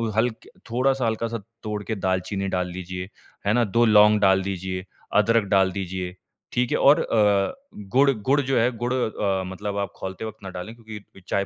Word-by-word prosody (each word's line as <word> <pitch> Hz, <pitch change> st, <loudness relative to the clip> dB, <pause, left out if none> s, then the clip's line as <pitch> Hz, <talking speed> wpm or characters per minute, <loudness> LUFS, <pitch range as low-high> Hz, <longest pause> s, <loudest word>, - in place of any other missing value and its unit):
Hulk 115 Hz, 0 st, 0 dB, 0.2 s
थोड़ा-सा 130 Hz, +1 st, +1 dB
हल्का-सा 115 Hz, +1 st, -1 dB, 0.3 s
तोड़ 105 Hz, -1 st, -3 dB
के 110 Hz, -, -3 dB
दालचीनी 95 Hz, +1 st, -1 dB
डाल 90 Hz, -1 st, -1 dB
लीजिए। 90 Hz, +1 st, -6 dB, 0.4 s
है 105 Hz, -, +4 dB
ना? 120 Hz, +1 st, +3 dB
2 115 Hz, +2 st, +2 dB
लौंग 105 Hz, -1 st, +6 dB
डाल 95 Hz, -1 st, +5 dB
दीजिए, 95 Hz, -1 st, -4 dB, 0.3 s
अदरक 115 Hz, +1 st, +4 dB
डाल 95 Hz, -1 st, +4 dB
दीजिए। 95 Hz, -1 st, -4 dB, 0.4 s
ठीक 125 Hz, 0 st, 0 dB
है? -, -, +2 dB
और 145 Hz, +4 st, +6 dB
अ, 105 Hz, -3 st, +2 dB, 0.4 s
गुड़ 140 Hz, +2 st, +5 dB
गुड़ 130 Hz, +5 st, +1 dB
जो 135 Hz, -1 st, 0 dB
है 115 Hz, -, +4 dB
अ, -, -, -11 dB
गुड़ 120 Hz, +2 st, -1 dB, 0.6 s
मतलब 100 Hz, +2 st, -4 dB
आप 100 Hz, -2 st, -2 dB
खोलते 95 Hz, +3 st, -6 dB
वक़्त 110 Hz, -2 st, -9 dB
ना 95 Hz, -, -6 dB
डालें 95 Hz, +5 st, -7 dB
क्योंकि 110 Hz, -4 st, -12 dB
चाय 100 Hz, 0 st, 0 dB
105 Hz, 185 wpm, -24 LUFS, 95-115 Hz, 0.6 s, लौंग